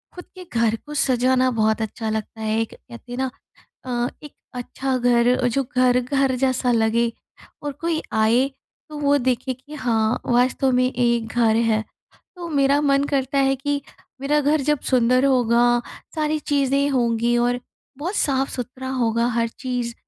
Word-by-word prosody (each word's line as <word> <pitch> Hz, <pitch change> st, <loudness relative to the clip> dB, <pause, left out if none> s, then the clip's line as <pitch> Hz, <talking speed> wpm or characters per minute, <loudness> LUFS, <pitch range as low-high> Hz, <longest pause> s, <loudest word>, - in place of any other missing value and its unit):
खुद 360 Hz, -, -9 dB
के 365 Hz, -, -8 dB
घर 230 Hz, -1 st, +2 dB
को 295 Hz, -, -8 dB
सजाना 255 Hz, -2 st, +2 dB
बहुत 220 Hz, -1 st, +1 dB
अच्छा 220 Hz, 0 st, -4 dB
लगता 220 Hz, 0 st, -4 dB
है 220 Hz, 0 st, 0 dB
एक 225 Hz, -, -4 dB
कहते 240 Hz, 0 st, -14 dB
हैं 245 Hz, -, -5 dB
ना 265 Hz, 0 st, 0 dB, 0.6 s
अ, 245 Hz, -1 st, -1 dB
एक 295 Hz, -, -10 dB, 0.2 s
अच्छा 255 Hz, +1 st, -3 dB
घर, 245 Hz, +1 st, +3 dB
जो 270 Hz, +3 st, 0 dB
घर, 250 Hz, 0 st, +4 dB
घर 270 Hz, +1 st, 0 dB
जैसा 255 Hz, -1 st, +1 dB
लगे 230 Hz, 0 st, +2 dB, 0.5 s
और 290 Hz, -, -2 dB
कोई 315 Hz, +3 st, -2 dB
आए 230 Hz, +5 st, +3 dB, 0.4 s
तो 305 Hz, -, -7 dB
वो 285 Hz, 0 st, +3 dB
देखे 255 Hz, 0 st, -1 dB
कि 260 Hz, +4 st, -15 dB
हाँ, 230 Hz, -5 st, 0 dB
वास्तव 255 Hz, +2 st, +2 dB
में 255 Hz, 0 st, +2 dB
एक 235 Hz, -2 st, +1 dB
घर 225 Hz, -1 st, +2 dB
है। 225 Hz, -1 st, +2 dB, 0.5 s
तो 350 Hz, -1 st, -7 dB
मेरा 280 Hz, -1 st, +3 dB
मन 275 Hz, -1 st, +3 dB
करता 275 Hz, -1 st, -1 dB
है 270 Hz, 0 st, +3 dB
कि 285 Hz, +1 st, -2 dB, 0.4 s
मेरा 295 Hz, +2 st, +2 dB
घर 295 Hz, +1 st, +2 dB
जब 295 Hz, +1 st, +1 dB
सुंदर 255 Hz, +1 st, +3 dB
होगा, 240 Hz, -2 st, +3 dB, 0.3 s
सारी 310 Hz, 0 st, 0 dB
चीज़ें 280 Hz, -1 st, +1 dB
होंगी 235 Hz, -2 st, +1 dB
और 245 Hz, +1 st, +1 dB, 0.4 s
बहुत 345 Hz, +8 st, -4 dB
साफ़-सुथरा 260 Hz, -, -2 dB
होगा 235 Hz, -3 st, +1 dB
हर 230 Hz, -1 st, 0 dB
चीज़। 245 Hz, 0 st, -4 dB
255 Hz, 165 wpm, -22 LUFS, 235-275 Hz, 0.6 s, घर